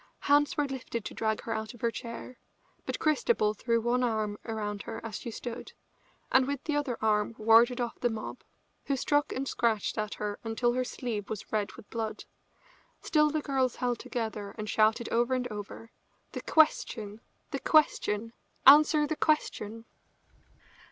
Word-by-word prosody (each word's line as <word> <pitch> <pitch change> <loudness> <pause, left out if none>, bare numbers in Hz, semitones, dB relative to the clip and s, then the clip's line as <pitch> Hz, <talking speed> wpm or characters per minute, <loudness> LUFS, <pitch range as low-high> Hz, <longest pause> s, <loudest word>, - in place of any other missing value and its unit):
Hands 290 0 +3
were 295 - +2
lifted 255 -4 -5
to - - -5
drag 220 -1 -1
her 225 - -3
out 220 +1 -4
of 240 - -17
her 235 - +1
chair, 235 +2 -8 0.5
but - - -2
Christabel 305 - +2
threw 230 +2 0
one 240 +2 +1
arm 215 -3 0
about 210 -3 -4
her - - -6
as 220 -2 -5
she - - -6
stood, 240 +1 -7 0.6
and 260 0 +5
with 280 -1 -3
the 305 - -1
other 285 -5 -1
arm 210 0 +2
warded 230 +3 +5
off 240 -1 -3
the 240 - +1
mob, 220 -1 -6 0.4
who 275 - 0
struck 290 +2 +1
and 270 +1 -3
scratched 225 -3 0
at 215 0 -2
her 205 -1 -4
until 235 +2 0
her 255 +1 0
sleeve 230 -5 -4
was 215 -2 -6
red 210 -2 0
with 230 -4 -13
blood. 225 -2 -4 0.8
Still 300 -1 +3
the 310 +1 -1
girls 265 -3 0
held 245 -1 -1
together 215 -4 -4
and 215 -1 -5
shouted 220 +2 +2
over 240 +2 +2
and 250 -1 -1
over: 210 +2 -8 0.4
"The - - -5
question! 225 -9 +2 0.3
The - - -2
question! 230 -7 +2 0.3
Answer 300 +2 +8
the 315 - -2
question!" 230 -8 -1
235 Hz, 170 wpm, -29 LUFS, 215-265 Hz, 0.8 s, Answer